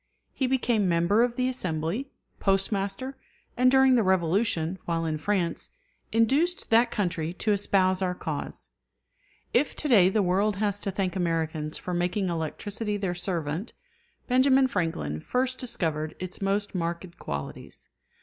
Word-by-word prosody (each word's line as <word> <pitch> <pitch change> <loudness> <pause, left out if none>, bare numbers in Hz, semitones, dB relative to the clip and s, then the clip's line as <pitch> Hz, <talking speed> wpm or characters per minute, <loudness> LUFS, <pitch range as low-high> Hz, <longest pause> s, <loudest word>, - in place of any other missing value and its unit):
He 265 - 0
became 240 -6 +1
member 170 +6 +3
of 240 0 +1
the 255 0 +1
Assembly, 185 - -2 0.3
Postmaster, 195 +6 0 0.4
and 250 +1 +4
during 265 0 +5
the 245 - +4
Revolution, 185 -1 +1
while 165 -1 -1
in 155 -1 -2
France, 180 -1 -1 0.4
induced 275 +11 +2
that 230 +2 +5
country 170 -5 -2
to 210 +4 -1
espouse 190 -2 +2
our 180 -1 0
cause. 150 - -5 0.8
If 270 +3 +2
to 300 - -3
day 200 -9 +6
the 205 +1 +2
world 195 +3 +2
has 205 0 0
to 200 - -2
thank 190 -1 -2
Americans 160 -3 -1
for 180 - -5
making 180 +2 0
electricity 205 +6 -3
their 195 -3 -2
servant, 175 +1 -3 0.5
Benjamin 260 +1 +5
Franklin 165 - -2
first 255 - -1
discovered 160 - -3
its 185 +1 -6
most 200 +1 0
marked 170 0 -4
qualities. 70 -1 -7
195 Hz, 140 wpm, -27 LUFS, 170-230 Hz, 0.8 s, day